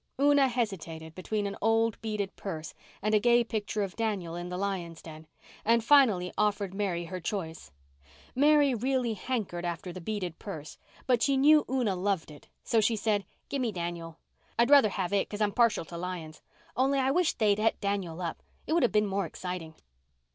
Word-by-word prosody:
Una 285 -1 +5
hesitated 175 -10 -3
between 205 +4 -3
an 200 - -3
old 225 0 +2
beaded 210 -3 -3
purse 160 -5 -6 0.3
and 215 +1 +1
a 215 - +6
gay 240 +2 +4
picture 215 -2 -2
of 195 -1 -5
Daniel 205 -7 -2
in 175 +1 -5
the 180 - -4
lion's 185 -4 -3
den, 155 -1 -11 0.4
and 230 +1 +3
finally 225 -10 +4
offered 205 -2 +1
Mary 190 -4 -2
her 185 +2 -5
choice. 165 - -5 0.6
Mary 290 0 +4
really 250 0 0
hankered 210 -5 -3
after 175 +1 -4
the 185 - -8
beaded 180 -3 -4
purse, 155 -7 -8 0.3
but 245 -3 +2
she 275 +1 +3
knew 300 +3 +6
Una 245 -7 +1
loved 185 -3 -1
it, 145 - -14 0.2
so 225 - +2
she 225 +2 +2
said, 205 -2 0 0.2
"Give 275 - -2
me 240 -3 0
Daniel. 170 -3 -5 0.4
I'd 235 +4 +3
rusher 280 -7 +7
have 190 -1 -3
it 200 - +1
'cause 205 - -6
I'm 210 -1 +2
partial 230 -6 +2
to 170 - -8
lions. 170 -3 -6 0.3
Only 270 +2 +2
I 265 0 +2
wish 350 +2 +2
they'd 210 -2 +2
et 220 +1 +1
Daniel 190 -4 -2
up. 170 - -4 0.2
It - - -1
would 340 - +3
have 245 - +3
been 210 0 +3
more 195 -2 -1
exciting." 170 -1 -6
205 Hz, 190 wpm, -29 LUFS, 175-235 Hz, 0.6 s, rusher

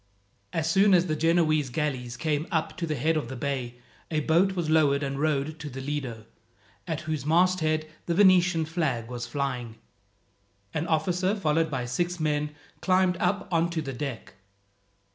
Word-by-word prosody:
As 160 -1 -1
soon 195 +3 +5
as 175 0 +4
the 155 -3 -1
Genoese 155 -3 +2
galleys 130 -3 -3
came 155 +1 -1
up 160 -3 -1
to 170 -2 -2
the 155 - -1
head 155 +5 +1
of 150 -6 -1
the 130 - -5
bay, 130 -2 -3 0.3
a 155 -2 0
boat 170 +6 +3
was 175 -3 -1
lowered 150 -2 +3
and 135 0 -3
rowed 155 +1 0
to 150 -1 -6
the 135 0 -7
Lido, 130 -5 -4 0.6
at 160 -3 -2
whose 155 -4 -3
masthead 160 -1 +2 0.2
the 170 - 0
Venetian 180 -4 +5
flag 145 -8 -2
was 120 -1 -5
flying. 125 -4 -3 1.0
An 160 +2 -2
officer, 180 +5 +1
followed 160 -4 +1
by 130 -4 -2
six 175 +8 -2
men, 150 -1 0 0.3
climbed 185 -1 +3
up 185 +3 0
on 170 0 +2
to 170 -2 -2
the 135 -2 -5
deck. 130 -2 -5
155 Hz, 170 wpm, -27 LUFS, 140-170 Hz, 1.0 s, soon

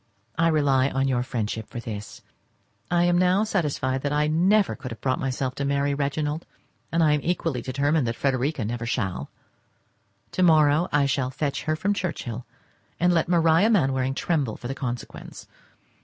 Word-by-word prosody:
I 165 +2 +2
rely 140 -4 +3
on 135 0 0
your 125 -2 +1
friendship 110 -3 -3
for 120 - -7
this. 105 -3 -7 0.7
I 175 -1 +3
am 175 0 +3
now 185 +3 +3
satisfied 145 -10 -1
that 145 - -2
I 150 +1 +2
never 190 +7 +3
could 130 -1 -7
have 115 -3 -8
brought 130 +3 0
myself 130 -1 -2
to 140 - -4
marry 140 0 +1
Reginald, 145 +2 -2 0.4
and 165 0 +2
am 150 -1 +3
equally 165 -6 -1
determined 140 +1 0
that 115 - -2
Frederica 135 -1 0
never 115 +1 -3
shall. 95 - -2 1.0
To - - -2
morrow, 155 -1 +4
I 145 -1 +3
shall 135 -2 0
fetch 145 +2 -3
her 155 +1 +1
from 200 +6 0
Churchhill, 130 - -4 0.5
and 180 +1 +3
let 165 0 +1
Maria 170 +3 +4
Mainwaring 135 - +1
tremble 140 -10 -1
for 120 - -7
the 135 - -3
consequence. 125 -3 -6
140 Hz, 170 wpm, -25 LUFS, 130-165 Hz, 1.0 s, morrow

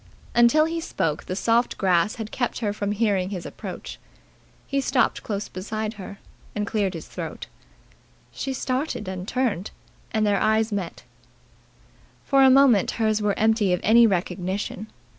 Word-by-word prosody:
Until 240 +6 +5
he 330 +1 -2
spoke 155 - -2
the 185 - -4
soft 230 +4 +1
grass 185 +2 +2
had 220 -2 -6
kept 245 -2 -2
her 210 -4 -1
from 205 -1 -2
hearing 200 -3 +1
his 185 -4 -5
approach. - - -8 0.7
He 275 0 -1
stopped 265 -1 +1
close 205 -1 -4
behind 215 +3 -4
her, 200 +2 -8 0.4
and 210 -1 -1
cleared 205 -4 -1
his 165 - -7
throat. - - -6 0.9
She 270 - -4
started 260 -4 -2
and 185 0 -5
turned, 235 -7 -1 0.4
and 220 -2 +1
their 205 -1 +2
eyes 220 +1 +2
met. 195 -4 -4 1.2
For 275 -1 +4
a 265 - +8
moment 260 -6 +5
hers 215 -1 +1
were 205 -1 0
empty 220 -3 +3
of 180 - +1
any 230 +2 +6
recognition. 190 +2 -2
215 Hz, 155 wpm, -24 LUFS, 195-235 Hz, 1.2 s, a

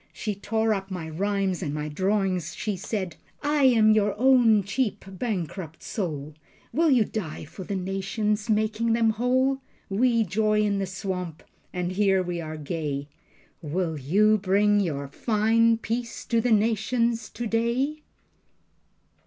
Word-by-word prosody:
She 215 - -3
tore 220 +2 0
up 195 -1 -4
my 180 -4 -5
rhymes 195 +2 -1
and 150 -4 -3
my 150 0 -3
drawings. 185 +1 0
She 210 -2 -2
said: 185 -3 -4 0.3
"I 290 -1 +2
am 225 -4 +6
your 210 -1 +2
own 240 -5 +5
cheap 210 +2 -2
bankrupt 185 -5 -4
soul. 155 - -4 0.4
Will 325 +2 +3
you 245 -6 +4
die 175 -9 -5
for 170 +5 -9
the 200 - -3
nations, 195 +3 -2
making 215 +1 +1
them 225 -1 +3
whole? 255 +4 +1 0.3
We 230 +2 +3
joy 215 +2 +1
in 205 -1 +1
the 195 - -1
swamp 180 -3 -5 0.3
and 180 0 -2
here 190 -1 +2
we 175 -1 -3
are 155 -1 -6
gay. 145 -2 -4 0.5
WILL 160 0 -2
YOU 210 +10 +3
BRING 205 +2 +3
YOUR 145 -7 -2
FINE 225 - +2
PEACE 235 +1 -4
TO 230 -1 +1
THE 245 - 0
NATIONS 225 +1 +1
TODAY?" 240 +6 -1
205 Hz, 145 wpm, -26 LUFS, 180-225 Hz, 0.5 s, am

